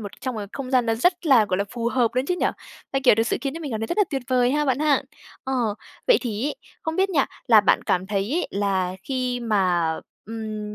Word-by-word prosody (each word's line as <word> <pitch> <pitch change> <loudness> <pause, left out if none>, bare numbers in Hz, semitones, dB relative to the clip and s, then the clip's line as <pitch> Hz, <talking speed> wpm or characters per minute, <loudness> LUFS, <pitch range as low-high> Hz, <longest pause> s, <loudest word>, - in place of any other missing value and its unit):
một 205 -2 -9
trong 255 -2 -3
một 210 - -4
không 265 -2 -6
gian 250 -3 +3
nó 225 - +2
rất 350 +9 +1
là, 255 -7 +6
gọi 185 -3 -1
là, 200 - +1
phù 235 -1 -2
hợp 240 -2 +2
nữa 255 - +2
chứ 360 - +1
nhỉ? - - +1 0.5
À, 270 - +1
kiểu, 255 - +7
thực 225 +1 +1
sự - - 0
khiến 275 0 -3
cho 330 - -6
mình 290 -4 -5
cảm 220 - -2
thấy 225 - -2
rất 345 - -3
là 415 - +5
tuyệt 270 -3 -2
vời 250 -1 +3
ha 300 +1 +1
bạn 265 -2 +1
ha? 295 -2 +2 0.4
Ờ, 265 - -3 0.5
vậy - - +6
thì 235 +1 -2
ấy, 295 - -2 0.3
không 320 0 -3
biết 385 +1 +2
nha, 285 -6 +2 0.2
là 220 -3 +8
bạn 200 - +3
cảm 185 +1 0
thấy 200 +1 -1
ấy, 355 - -1
là 190 -2 0
khi 255 -1 -2
mà, 185 -8 +1 0.3
ừm, 215 -1 -5
245 Hz, 265 wpm, -24 LUFS, 210-275 Hz, 0.5 s, là